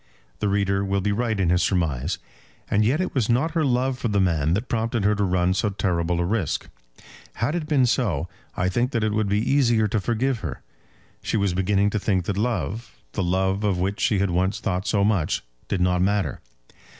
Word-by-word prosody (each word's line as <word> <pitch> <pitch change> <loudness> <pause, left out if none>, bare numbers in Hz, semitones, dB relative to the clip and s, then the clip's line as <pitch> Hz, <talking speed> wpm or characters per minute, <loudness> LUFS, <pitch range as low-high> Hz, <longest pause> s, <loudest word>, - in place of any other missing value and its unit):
The 105 - 0
reader 100 0 +1
will 100 0 0
be 100 +2 0
right 110 0 -1
in 90 -3 +2
his 90 0 +3
surmise. 80 -4 0 0.5
And 105 +2 +3
yet 130 +9 +2
it 185 - -2
was 125 -5 0
not 130 +8 +2
her 160 0 +1
love 130 -1 +1
for 120 - -1
the 105 -2 +1
man 85 -4 +2
that 110 +6 -3
prompted 115 -1 -1
her 105 +1 +3
to 105 0 0
run 90 -1 +2
so 105 +3 0
terrible 90 -3 0
a 85 - +1
risk. 100 -1 -1 0.7
Had 115 +6 -1
it 170 -3 -2
been 140 -5 +3
so, 110 - 0 0.3
I 90 - +1
think 120 +8 0
that 115 -3 0
it 110 -1 +1
would 110 -1 0
be 100 - +2
easier 120 -2 +3
to 110 - +1
forgive 120 +4 0
her. - - -6 0.6
She - - -1
was 100 -3 +1
beginning 100 +2 +2
to 105 - 0
think 95 -3 0
that 100 - -1
love, 110 +1 -2
the - - -2
love 95 +3 0
of 100 -3 +1
which 95 +3 -1
she 105 - +2
had 95 -1 +1
once 95 +3 0
thought 95 -1 -2
so 100 -2 +2
much, 100 -7 +1 0.2
did 95 - -1
not 90 0 +2
matter. 100 +1 0
100 Hz, 215 wpm, -24 LUFS, 95-115 Hz, 0.7 s, his